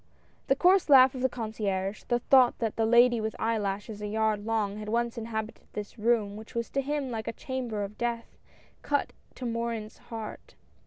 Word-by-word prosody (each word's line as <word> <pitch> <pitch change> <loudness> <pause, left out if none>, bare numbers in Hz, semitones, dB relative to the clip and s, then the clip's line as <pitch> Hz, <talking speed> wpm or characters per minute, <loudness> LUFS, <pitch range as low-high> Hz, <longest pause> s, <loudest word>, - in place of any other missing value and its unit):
The 270 - +4
coarse 365 +4 +4
laugh 265 -2 +8
of 255 - -5
the 260 - +2
concierge 210 -4 -3
— - - -32
the 240 - +2
thought 250 0 +4
that 225 -3 -2
the 225 -1 +1
lady 240 0 +5
with 220 0 -3
eyelashes 210 -1 -2
a 210 - -3
yard 215 -1 0
long, 210 -3 0
had 210 0 -6
once 235 +1 0
inhabited 220 -1 -5
this 210 +2 -7
room, 210 -2 +1
which 220 +2 -12
was 235 0 -2
to 275 - 0
him 280 -1 -2
like 220 -2 -4
a - - 0
chamber 245 -7 -4
of 200 +1 -8
death, 235 -1 -3 0.4
cut 285 -1 -1 0.2
to 255 - -6
Morin's 230 -2 -3
heart. 225 -3 -7
230 Hz, 195 wpm, -28 LUFS, 215-245 Hz, 0.4 s, laugh